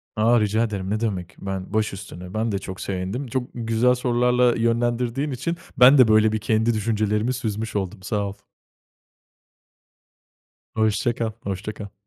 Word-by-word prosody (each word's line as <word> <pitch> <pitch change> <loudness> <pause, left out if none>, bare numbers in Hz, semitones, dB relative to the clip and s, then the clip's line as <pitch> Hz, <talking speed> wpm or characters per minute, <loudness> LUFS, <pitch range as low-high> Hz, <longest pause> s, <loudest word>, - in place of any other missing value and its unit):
A, 115 +2 +4
rica 110 +2 +1
ederim, 100 -4 -3
ne 105 +1 0
demek, 95 -6 -3
ben 95 0 -5
başüstüne, 95 -3 -3
ben 110 +1 -1
de 100 - -1
çok 95 -1 -7
sevindim. 100 +8 -3
Çok 130 +1 -1
güzel 115 +2 +2
sorularla 125 0 +2
yönlendirdiğin 120 +4 0
için 165 +7 -3 0.2
ben 130 +3 +8
de, 125 -3 +7
böyle, 110 0 +4
bir 110 - -1
kendi 110 +1 +1
düşüncelerimi 110 +2 0
süzmüş 110 -3 -4
oldum, 95 -1 -3
sağ 100 0 -1
ol. 100 - -5 2.4
Hoşça 110 +2 +1
kal, 115 -3 -2
hoşça 100 +2 -4
kal. 100 -1 -9
110 Hz, 150 wpm, -23 LUFS, 100-120 Hz, 2.4 s, ben